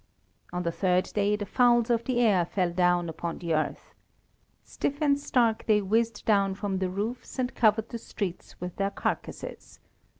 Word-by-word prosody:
On 180 0 -2
the 170 - 0
third 180 +1 +1
day 205 0 +2
the 205 0 -4
fowls 240 +1 +3
of 235 -1 +1
the 250 -2 +1
air 205 -7 +4
fell 180 0 -1
down 175 0 +2
upon 165 +1 -4
the 170 -2 -2
earth. 155 0 -2 0.7
Stiff 285 +1 -3
and 285 -2 +3
stark 235 -5 +1
they 215 -2 +5
whizzed 225 +2 0
down 200 -3 +3
from 195 -1 -2
the 185 -1 0
roofs 215 +9 -4
and 255 -1 -1
covered 220 0 +2
the 235 - -5
streets 190 -5 -6
with 180 0 -6
their 195 0 +1
carcases. 200 - -5
205 Hz, 175 wpm, -28 LUFS, 180-230 Hz, 0.7 s, they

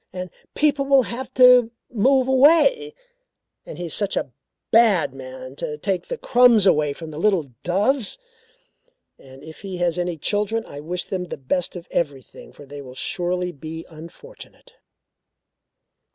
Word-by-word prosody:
And 180 -1 -6 0.2
people 290 -2 +1
will 275 -1 +4
have 250 +2 -6
to 250 -2 +7 0.2
move 260 +3 +3
away. 335 - +4 0.7
And - - -8
he 175 - -5
is 165 - -5
such 200 -2 -1
a - - -3 0.4
bad 205 - +4
man 130 0 -10
to 150 - -4
take 190 +4 -2
the - - -4
crumbs 245 - +4
away 150 -6 +3
from 160 +1 -9
little 165 -3 0
doves. 210 - 0 1.0
And 135 +1 -15
if 160 0 -12
he 190 -2 -6
has 175 0 0
any 175 -1 -2
children, 210 +7 -1
I 145 - -10
wish 175 +4 -4
them 185 -2 -4
the - - -7
best 165 +8 -2
of 175 -1 -9
everything 140 -6 -4
for 145 - -14
they 145 +1 -9
surely 180 +4 -2
will 145 - -22
be 160 +2 -7
unfortunate." 175 - -14
180 Hz, 150 wpm, -22 LUFS, 155-250 Hz, 1.0 s, to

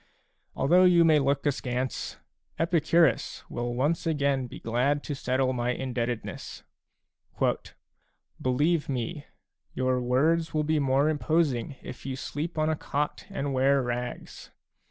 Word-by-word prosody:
Although 180 +7 +5
you 175 -2 +6
may 155 -2 +5
look 140 +1 0
askance, 130 -2 -2 0.4
Epicurus 165 -2 +2
a - - -13
will 120 0 -2
once 150 +7 0
again 140 -4 +1
be - - -10
glad 130 +6 0
to 145 - -4
settle 130 -1 0
my 125 0 0
indebtedness: 120 -3 -4 0.9
" - - -16
Believe 145 +6 +1
me, 140 +4 -3 0.5
your 130 -1 +1
words 155 +7 +1
will 155 - +2
be 155 0 +1
more 135 +1 +2
imposing 150 -4 0
if - - -9
you 135 0 -4
sleep 150 +5 -5
on 155 0 +2
a 160 - +1
cot 150 0 -3
and 140 0 -3
wear 135 +2 +3
rags. 125 0 -5
140 Hz, 135 wpm, -27 LUFS, 125-155 Hz, 0.9 s, you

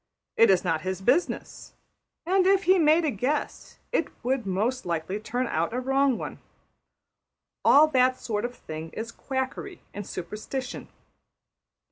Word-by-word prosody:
It 230 - +6
is 190 -2 +4
not 165 -4 0
his 185 +1 -3
business, 255 - -1 0.5
and 370 +1 +3
if 390 0 +4
he 370 +1 +5
made 315 +1 +4
a 300 - +1
guess 260 +7 -3
it - - +1 0.2
would 250 -3 -1
most 220 +7 0
likely 170 +3 -2
turn 245 +4 -2
out 170 +1 -1
a - - 0
wrong 270 0 +2
one. - - -6 1.2
All 295 +2 +7
that 255 -2 +3
sort 210 -2 -2
of 245 +1 -4
thing 155 -4 -7
is 230 +1 -5
quackery 265 +10 -4
and 205 -1 -6
superstition. 215 +8 -5
250 Hz, 145 wpm, -26 LUFS, 195-280 Hz, 1.2 s, All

